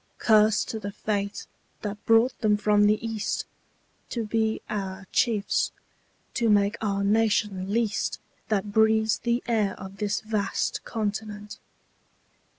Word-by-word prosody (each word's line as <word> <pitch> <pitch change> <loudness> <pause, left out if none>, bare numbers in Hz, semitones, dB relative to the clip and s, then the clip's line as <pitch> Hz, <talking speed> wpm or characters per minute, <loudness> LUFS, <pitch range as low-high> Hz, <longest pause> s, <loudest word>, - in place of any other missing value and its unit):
Curse 215 -1 +4
to 220 - -5
the 200 -1 -5
fate 200 0 -3 0.4
that 205 0 -5
brought 225 +3 +5
them 210 -2 +3
from 205 0 +4
the 210 +1 +4
East 220 -2 -2 0.6
To 230 -2 -2
be 220 0 0
our 195 -2 -4
chiefs 215 -4 +1 0.6
to 235 -2 +1
make 205 0 +3
our 200 -2 0
nation 205 -2 +1
least 225 0 0 0.3
That 205 -1 0
breathes 220 0 +3
the 235 +1 0
air 215 -5 0
of 195 0 -9
this 210 0 -1
vast 215 -3 -1
continent. 210 -1 -4
210 Hz, 130 wpm, -26 LUFS, 205-220 Hz, 0.6 s, brought